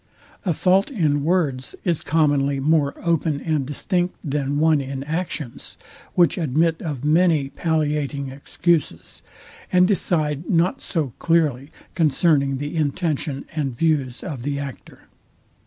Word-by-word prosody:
A 175 Hz, -, +3 dB
fault 190 Hz, +4 st, +3 dB
in 155 Hz, -, +1 dB
words 150 Hz, -6 st, 0 dB
is 170 Hz, -4 st, 0 dB
commonly 145 Hz, -3 st, +2 dB
more 145 Hz, 0 st, +2 dB
open 165 Hz, -3 st, +1 dB
and 150 Hz, -4 st, -1 dB
distinct 175 Hz, +5 st, -1 dB
than 145 Hz, -1 st, -1 dB
one 155 Hz, -1 st, +3 dB
in 135 Hz, 0 st, -5 dB
actions, 155 Hz, -4 st, -4 dB, 0.4 s
which 175 Hz, 0 st, +3 dB
admit 160 Hz, +2 st, +1 dB
of 145 Hz, -5 st, -4 dB
many 155 Hz, -3 st, +3 dB
palliating 150 Hz, -2 st, -1 dB
excuses, 145 Hz, -, -1 dB, 0.5 s
and 180 Hz, 0 st, +5 dB
decide 155 Hz, -6 st, 0 dB
not 175 Hz, +1 st, +2 dB
so 150 Hz, -8 st, -2 dB
clearly 150 Hz, -5 st, +1 dB, 0.2 s
concerning 145 Hz, -3 st, +2 dB
the 145 Hz, +4 st, -5 dB
intention 150 Hz, -2 st, -1 dB
and 140 Hz, -6 st, -2 dB
views 140 Hz, -6 st, 0 dB
of 135 Hz, -6 st, -5 dB
the 140 Hz, +2 st, -2 dB
actor. 140 Hz, -2 st, -8 dB
150 Hz, 125 wpm, -22 LUFS, 140-165 Hz, 0.5 s, and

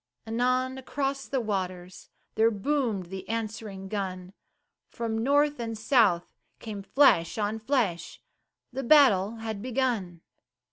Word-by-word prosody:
Anon 255 Hz, +3 st, 0 dB
across 275 Hz, +1 st, -3 dB
the 270 Hz, -, -1 dB
waters 185 Hz, -5 st, -4 dB, 0.2 s
There 225 Hz, +1 st, +4 dB
boomed 220 Hz, -5 st, -1 dB
the 190 Hz, 0 st, -7 dB
answering 215 Hz, -3 st, -4 dB
gun, 190 Hz, -2 st, -4 dB, 0.6 s
From 230 Hz, -2 st, -3 dB
North 290 Hz, +2 st, +2 dB
and 225 Hz, -1 st, -4 dB
South 220 Hz, -7 st, +2 dB, 0.2 s
came 210 Hz, -3 st, -7 dB
flash 195 Hz, -, +3 dB
on 215 Hz, +1 st, -1 dB
flash 220 Hz, -, -1 dB, 0.5 s
The 265 Hz, -, -3 dB
battle 235 Hz, -7 st, +5 dB
had 220 Hz, -2 st, -5 dB
begun. 230 Hz, -9 st, -2 dB
225 Hz, 120 wpm, -27 LUFS, 195-255 Hz, 0.6 s, battle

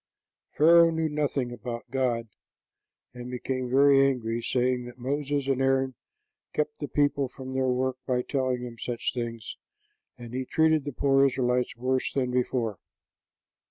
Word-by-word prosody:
Pharaoh 170 Hz, +2 st, +6 dB
knew 160 Hz, -1 st, -1 dB
nothing 145 Hz, -4 st, -1 dB
about 120 Hz, +1 st, -7 dB
God, 120 Hz, -3 st, 0 dB, 0.9 s
and 125 Hz, 0 st, -8 dB
became 125 Hz, 0 st, -3 dB
very 135 Hz, +1 st, +5 dB
angry, 120 Hz, -4 st, 0 dB
saying 125 Hz, +1 st, 0 dB
that 120 Hz, 0 st, -10 dB
Moses 140 Hz, +2 st, -2 dB
and 135 Hz, -1 st, +1 dB
Aaron 135 Hz, 0 st, +2 dB, 0.6 s
kept 455 Hz, 0 st, -2 dB
the -, -, -4 dB
people 145 Hz, -1 st, +1 dB
from 130 Hz, +1 st, -9 dB
their 130 Hz, 0 st, 0 dB
work 130 Hz, +1 st, 0 dB
by 125 Hz, -1 st, +1 dB
telling 130 Hz, -3 st, -1 dB
them 120 Hz, -2 st, -8 dB
such 120 Hz, -2 st, -3 dB
things; 115 Hz, -3 st, -5 dB, 0.6 s
and 120 Hz, -1 st, -10 dB
he 130 Hz, +1 st, -2 dB
treated 160 Hz, +1 st, +2 dB
the 145 Hz, -, -3 dB
poor 135 Hz, +1 st, +3 dB
Israelites 125 Hz, -2 st, +1 dB
worse 130 Hz, +2 st, 0 dB
than 130 Hz, -2 st, -1 dB
before. 120 Hz, -4 st, -1 dB
130 Hz, 150 wpm, -27 LUFS, 125-140 Hz, 0.9 s, Pharaoh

